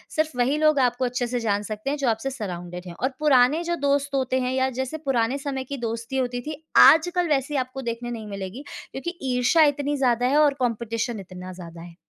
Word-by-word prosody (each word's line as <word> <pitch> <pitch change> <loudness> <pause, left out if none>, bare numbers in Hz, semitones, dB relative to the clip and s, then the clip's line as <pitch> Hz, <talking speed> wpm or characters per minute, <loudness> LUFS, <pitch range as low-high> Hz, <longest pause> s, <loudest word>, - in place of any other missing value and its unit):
सिर्फ़ 310 0 +1
वही 255 +4 +2
लोग 305 -2 +4
आपको 250 0 +1
अच्छे 245 0 -1
से 245 +1 -2
जान 205 -3 0
सकते 215 +4 -4
हैं 295 - -1
जो 275 -4 +1
आपसे 225 +4 -1
सराउंडेड 180 -6 -6
हैं 175 - -7
और 260 - +3
पुराने 290 +1 +4
जो 345 0 -1
दोस्त 280 0 +1
होते 260 -1 +1
हैं 250 0 -1
या 260 0 +1
जैसे 265 +4 -4
पुराने 250 -1 +1
समय 275 -1 -3
की 280 +2 -6
दोस्ती 230 +1 -4
होती 245 -1 -1
थी, 305 +3 -7
आजकल 345 +4 +6
वैसे 285 0 0
आपको 255 +1 -3
देखने 240 0 -4
नहीं 225 -2 -6
मिलेगी 200 +5 -6 0.3
क्योंकि 345 +6 -5 0.2
ईर्ष्या 250 +6 +4
इतनी 290 0 -2
ज़्यादा 245 -2 +2
है 280 +3 +2
और 295 -2 +5
कॉम्पिटिशन 230 -1 -2
इतना 185 -1 -9
ज़्यादा 170 -2 -10
है। 170 0 -11
255 Hz, 215 wpm, -24 LUFS, 230-280 Hz, 0.3 s, आजकल